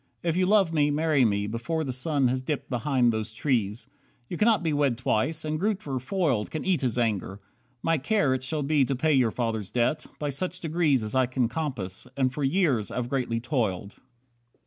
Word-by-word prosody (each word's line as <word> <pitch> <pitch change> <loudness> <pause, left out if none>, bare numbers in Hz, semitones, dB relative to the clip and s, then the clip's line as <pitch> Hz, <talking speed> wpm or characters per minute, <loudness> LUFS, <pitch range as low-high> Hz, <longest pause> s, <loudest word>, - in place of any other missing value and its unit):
If 170 -1 0
you 185 0 +2
love 195 -5 +4
me, 150 -2 +3
marry 150 -2 +2
me 100 -2 +1
Before 120 +10 -2
the 135 - -3
sun 135 +1 0
has 130 +1 0
dipped 140 +1 -4
behind 125 -2 +2
those 110 0 -3
trees. 115 -4 -1 0.4
You - - -3
cannot 210 -1 +3
be 160 -2 0
wed 140 -5 +1
twice, 145 +6 0
and 155 0 -2
Grootver, 185 - -1
foiled, 135 - 0
Can 155 - -5
eat 185 -4 +1
his 125 -3 -1
anger. 105 -5 -1 0.5
My 165 -2 +2
care 150 -2 +2
it 130 - -2
shall 150 +2 -2
be 145 0 +3
To 135 +1 0
pay 155 +4 +2
your 130 -4 +4
father's 110 -4 -2
debt, 125 +6 0
by 150 - -2
such 180 +6 -3
degrees 155 -7 +1
As 105 - -5
I 130 -1 +3
can 130 -1 0
compass, 120 - -4
and 130 -2 +1
for 145 - -3
years 135 - +1
I've 125 -1 -3
greatly 125 -4 -1
toiled. 110 -6 -2
135 Hz, 200 wpm, -27 LUFS, 120-155 Hz, 0.5 s, love